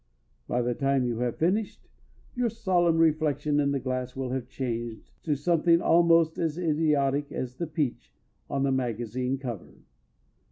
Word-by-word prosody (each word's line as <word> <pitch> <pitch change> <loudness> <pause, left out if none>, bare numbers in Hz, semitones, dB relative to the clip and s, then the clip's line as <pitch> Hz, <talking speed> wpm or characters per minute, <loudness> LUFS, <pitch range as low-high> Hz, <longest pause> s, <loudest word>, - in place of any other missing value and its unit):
_ - - -43 0.4
By 125 0 0
the 120 +1 0
time 135 0 +1
you 120 -2 -2
have 120 -1 -1
finished, 195 +6 -1 0.5
your 245 -1 0
solemn 175 -6 +1
reflection 155 -2 +2
in 140 -1 +2
the 140 -1 0
glass 130 -1 -3
will 130 -1 -3
have 130 -1 -3
changed 120 -4 -5
to 150 -3 +1
something 170 +3 +3
almost 165 -1 +4
as 160 -1 -1
idiotic 150 -4 +1
as 125 0 -5
the 170 - -3
"peach" 150 -5 -3 0.4
on 135 - -1
the 140 - +2
magazine 125 0 -2
cover. 120 -8 -7
140 Hz, 160 wpm, -27 LUFS, 125-165 Hz, 0.5 s, almost